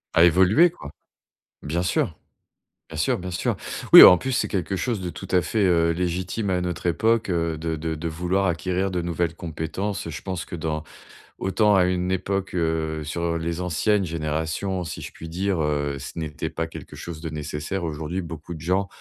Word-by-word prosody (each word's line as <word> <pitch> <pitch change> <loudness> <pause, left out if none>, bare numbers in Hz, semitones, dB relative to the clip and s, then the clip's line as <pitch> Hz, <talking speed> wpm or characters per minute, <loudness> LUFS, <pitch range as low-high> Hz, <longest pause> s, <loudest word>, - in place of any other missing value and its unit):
A 85 - +7
évoluer 95 - +5
quoi. 160 - -11 0.7
Bien 85 +4 -1
sûr, 90 -2 0 0.7
bien 80 - -7
sûr, 75 - +1
bien 90 +1 -5
sûr. 85 - -1 0.4
Oui, - - +14
en 90 - +11
plus, 130 - -3
c'est 125 - +1
quelque 95 -1 -2
chose 115 +2 -1
de 90 -2 -4
tout 95 - -9
à 90 - +3
fait, 105 +7 0
heu, 85 -3 +3
légitime 90 +4 -2
à 90 -1 +1
notre 90 0 -3
époque, 110 +5 +2
heu, 85 -2 0
de 80 0 -2
de 80 +1 -3
de 80 +2 -4
vouloir 90 +4 0
acquérir 90 +3 0
de 90 -1 -2
nouvelles 85 -1 -1
compétences. 85 +5 -4
Heu, - - -4
je 80 - -6
pense 95 -3 -3
que - - -7
dans 80 -2 -3 0.5
autant 105 +2 +2
à 95 - +5
une 90 0 0
époque, 95 +1 -2
heu, 80 -2 -1
sur, 75 +3 -4
heu, - - 0
les 85 +1 -3
anciennes 95 +4 +1
générations 80 +4 -2
si 75 - -6
je - - -7
puis 80 - -10
dire, 95 +2 -1
heu, 75 -2 -1
ce 70 - -8
n'était 80 0 -4
pas 80 +1 -3
quelque 80 - -10
chose 85 -2 -7
de 80 0 -5
nécessaire. 75 +4 -4
Aujourd'hui, 80 +3 -3
beaucoup 80 0 -7
de 80 - -9
gens 95 +4 +1
85 Hz, 200 wpm, -24 LUFS, 80-95 Hz, 0.7 s, Oui